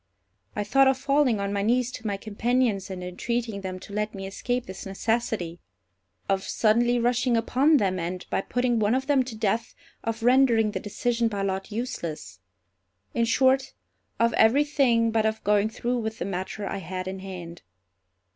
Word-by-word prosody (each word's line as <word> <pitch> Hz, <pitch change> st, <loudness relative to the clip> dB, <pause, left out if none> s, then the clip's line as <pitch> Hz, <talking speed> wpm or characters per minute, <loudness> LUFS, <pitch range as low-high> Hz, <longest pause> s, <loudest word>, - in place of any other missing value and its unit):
I 210 Hz, -, -1 dB
thought 270 Hz, +6 st, +4 dB
of 265 Hz, 0 st, +3 dB
falling 275 Hz, -4 st, +2 dB
on 200 Hz, 0 st, -2 dB
my 200 Hz, -, 0 dB
knees 245 Hz, +4 st, +1 dB
to 230 Hz, -3 st, -6 dB
my 200 Hz, -1 st, -1 dB
companions, 220 Hz, 0 st, 0 dB
and 185 Hz, -1 st, -6 dB
entreating 220 Hz, +4 st, -3 dB
them 185 Hz, -1 st, -5 dB
to 200 Hz, -, -11 dB
let 210 Hz, 0 st, -2 dB
me 195 Hz, 0 st, -6 dB
escape 245 Hz, +5 st, -2 dB
this 190 Hz, 0 st, -8 dB
necessity; 195 Hz, -4 st, -2 dB, 0.7 s
of 195 Hz, -1 st, +1 dB
suddenly 235 Hz, +4 st, +2 dB
rushing 245 Hz, 0 st, +2 dB
upon 270 Hz, +7 st, +3 dB
them, 190 Hz, -6 st, 0 dB
and, 180 Hz, +2 st, -4 dB
by -, -, +1 dB
putting 245 Hz, +1 st, 0 dB
one 215 Hz, +3 st, +2 dB
of 265 Hz, 0 st, -1 dB
them 280 Hz, -2 st, +3 dB
to 250 Hz, -3 st, -5 dB
death, 220 Hz, +1 st, -1 dB, 0.3 s
of 225 Hz, 0 st, -3 dB
rendering 240 Hz, -3 st, +4 dB
the -, -, -3 dB
decision 235 Hz, +3 st, -1 dB
by 200 Hz, -3 st, -2 dB
lot 195 Hz, +1 st, -3 dB
useless—in 95 Hz, -, -6 dB
short, 260 Hz, +4 st, +2 dB, 0.5 s
of 230 Hz, 0 st, +3 dB
every 250 Hz, +7 st, +5 dB
thing 245 Hz, -6 st, +2 dB
but 220 Hz, -1 st, +2 dB
of 220 Hz, 0 st, -3 dB
going 210 Hz, +1 st, +3 dB
through 240 Hz, +2 st, -2 dB
with 220 Hz, -1 st, -4 dB
the -, -, -3 dB
matter 190 Hz, +2 st, -4 dB
I 195 Hz, -, -3 dB
had 185 Hz, -1 st, -5 dB
in 190 Hz, 0 st, -5 dB
hand. 180 Hz, -3 st, -8 dB
220 Hz, 175 wpm, -26 LUFS, 195-245 Hz, 0.7 s, every